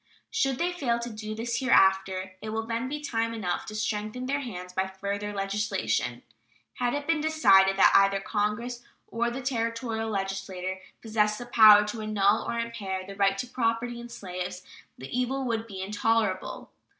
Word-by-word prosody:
Should 270 - +1
they 350 +4 0
fail 265 -10 0
to 235 0 -5
do 215 0 -6
this 230 +1 -2
hereafter, 190 -6 +3
it 215 - -5
will 220 +1 -2
then 230 +3 -2
be 295 +2 -3
time 230 -5 -1
enough 185 -6 -3
to 215 - -6
strengthen 215 +3 -2
their 280 +2 0
hands 180 -9 -7
by 190 +1 0
further 200 +2 -4
legislation. 195 - -1 0.5
Had 245 +2 0
it 290 0 -3
been 325 -1 +1
decided 195 -12 +5
that - - +6
either 195 0 +5
Congress 215 +4 -2 0.2
or 235 +1 -1
the 250 +2 -5
Territorial 230 -2 -2
legislature 195 -2 -3 0.2
possess 215 -1 +1
the 245 - -7
power 215 -3 +8
to 220 +1 -5
annul 215 0 +2
or 235 - -2
impair 205 -5 -3
the 195 +1 -9
right 195 -1 +2
to 225 - -2
property 235 0 -1
in 240 0 -9
slaves, 180 -3 -6 0.3
the 130 - -9
evil 255 +2 0
would 230 -2 -2
be 190 -3 -6
intolerable. 210 -1 -1
215 Hz, 175 wpm, -27 LUFS, 195-235 Hz, 0.5 s, power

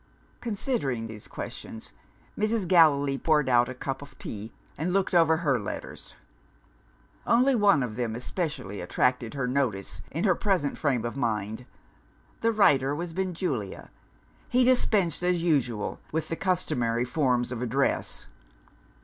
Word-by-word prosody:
Considering 205 - -2
these 110 -2 -9
questions, 110 - -8 0.4
Mrs. 215 -2 0
Gallilee 145 -6 +4
poured 150 -3 +2
out 120 -1 +4
a 130 - -6
cup 135 +2 -4
of 140 -1 -12
tea 110 +2 -7 0.2
and 165 +5 -2
looked 195 0 +1
over 165 -2 +5
her 145 -7 +1
letters. 105 - -7 1.1
Only 250 +4 +4
one 200 - +4
of 110 -4 -4
them 115 -3 -2
especially 125 - -4
attracted 125 +7 0
her 135 -2 -1
notice 105 -8 -1
in 165 - -3
her 190 - +4
present 180 -6 0
frame 130 -6 0
of 120 - -3
mind. 110 -2 -2 0.7
The 230 - +2
writer 145 -10 +3
was 170 +1 -5
Benjulia. 170 - -3 0.6
He 250 +1 +4
dispensed 215 - +2
as 180 -1 +1
usual 125 -10 0
with 160 +1 -2
the 165 - -1
customary 125 -11 0
forms 125 -3 +1
of 125 -2 -4
address. 125 +3 -1
140 Hz, 140 wpm, -27 LUFS, 120-180 Hz, 1.1 s, over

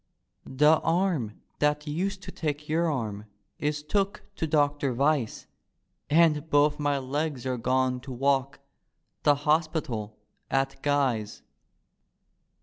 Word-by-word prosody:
" - - -48 0.2
The 155 +1 +7
arm 165 - 0 0.2
diat 150 0 +1
used 190 +6 -2
to 185 - -7
take 150 -3 -3
your 165 +1 +1
arm 110 -6 -3 0.3
Is 150 0 -1
took 195 +5 -1
to 160 - -1
Doctor 145 -3 +1
Vyse; 140 -3 0 0.6
And 155 -1 +3
both 145 0 +3
my 145 -1 +1
legs 140 0 -3
are 130 -1 -1
gone 130 +1 +1
to 130 +2 -9
walk 135 +2 0 0.6
The 145 -1 +4
hospital 150 -9 0 0.3
at 135 0 -1
Guy's. 135 -7 0
145 Hz, 125 wpm, -27 LUFS, 130-155 Hz, 0.6 s, The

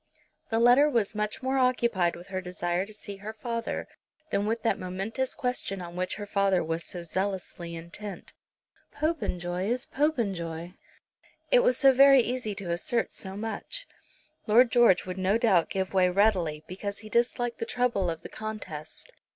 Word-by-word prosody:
The 225 - +1
letter 245 +6 +6
was 230 -7 +1
much 210 +3 -3
more 265 +1 +1
occupied 235 -9 +2
with 175 +2 -12
her 185 -1 -3
desire 180 +1 -2
to - - -10
see 205 -1 -8
her 210 +3 -7
father 230 +1 -4 0.4
than 200 +1 +1
with 225 +1 -1
that 225 - +1
momentous 195 +8 -3
question 250 -7 -2
on 175 -1 -8
which 185 0 -1
her 205 - -6
father 195 -3 +2
was 165 +1 -2
so 175 -1 -5
zealously 180 -1 -3
intent. 180 +5 -8 0.6
Popenjoy 180 - -2
is 250 +3 0
Popenjoy! 190 - -1 0.8
It - - +7
was - - +3
very 270 0 +8
easy 240 -4 -3
to 190 -3 -4
assert 225 +7 0
so 190 0 -6
much. 225 - -4 0.6
Lord 235 +3 +6
George 235 -7 +5
would 185 0 -5
no 190 +3 +2
doubt 195 -8 +3
give 190 0 -2
way 185 -1 +4
readily, 180 -6 +2
because 200 +2 -5
he - - -7
disliked 240 +1 0
the 230 - -3
trouble 235 -8 +1
of 165 0 -5
the - - -8
contest. 215 - -7
205 Hz, 165 wpm, -28 LUFS, 180-240 Hz, 0.8 s, very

